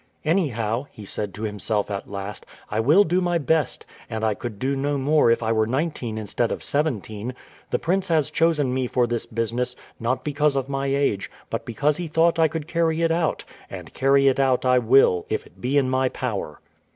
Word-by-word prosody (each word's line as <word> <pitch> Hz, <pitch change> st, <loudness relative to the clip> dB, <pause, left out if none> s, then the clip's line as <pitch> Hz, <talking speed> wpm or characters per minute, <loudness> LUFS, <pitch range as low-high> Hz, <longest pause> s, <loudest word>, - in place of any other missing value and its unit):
"Anyhow," 130 Hz, -, 0 dB
he 105 Hz, -, -11 dB
said 105 Hz, +1 st, -4 dB
to 105 Hz, -, -7 dB
himself 105 Hz, 0 st, -1 dB
at 100 Hz, -, -5 dB
last, 100 Hz, +1 st, -6 dB, 0.3 s
"I 105 Hz, -, 0 dB
will 150 Hz, -, +5 dB
do 180 Hz, +1 st, +1 dB
my 175 Hz, -1 st, +1 dB
best; 160 Hz, -2 st, 0 dB, 0.2 s
and 110 Hz, -1 st, -4 dB
I 110 Hz, -1 st, +2 dB
could 110 Hz, 0 st, -6 dB
do 135 Hz, +5 st, -1 dB
no 140 Hz, +1 st, -1 dB
more 145 Hz, -1 st, +3 dB
if 115 Hz, 0 st, +2 dB
I 110 Hz, -, +1 dB
were 110 Hz, -1 st, +2 dB
nineteen 130 Hz, -4 st, -2 dB
instead 110 Hz, +2 st, -1 dB
of -, -, -4 dB
seventeen. 125 Hz, -5 st, -2 dB, 0.3 s
The -, -, +1 dB
prince 190 Hz, +3 st, 0 dB
has 160 Hz, -5 st, +1 dB
chosen 155 Hz, -6 st, +2 dB
me 130 Hz, -1 st, 0 dB
for 125 Hz, 0 st, +2 dB
this 120 Hz, -1 st, -3 dB
business, 120 Hz, +2 st, -1 dB, 0.2 s
not 125 Hz, +2 st, -1 dB
because 150 Hz, -1 st, +1 dB
of 135 Hz, -1 st, -1 dB
my 135 Hz, 0 st, -2 dB
age, 135 Hz, -7 st, 0 dB, 0.2 s
but -, -, -3 dB
because 145 Hz, +6 st, 0 dB
he 175 Hz, -1 st, -4 dB
thought 165 Hz, +2 st, +2 dB
I 160 Hz, -, +6 dB
could 155 Hz, 0 st, -5 dB
carry 165 Hz, -1 st, +1 dB
it 165 Hz, -, +3 dB
out; 165 Hz, -1 st, 0 dB, 0.2 s
and -, -, -9 dB
carry 135 Hz, +1 st, +3 dB
it 135 Hz, 0 st, +3 dB
out 130 Hz, -2 st, +2 dB
I 125 Hz, 0 st, +5 dB
will, 115 Hz, -7 st, +4 dB
if -, -, -2 dB
it 95 Hz, -, -20 dB
be 135 Hz, +3 st, +1 dB
in 135 Hz, -2 st, +3 dB
my 130 Hz, 0 st, +1 dB
power." 105 Hz, -14 st, -4 dB
130 Hz, 210 wpm, -24 LUFS, 115-150 Hz, 0.3 s, I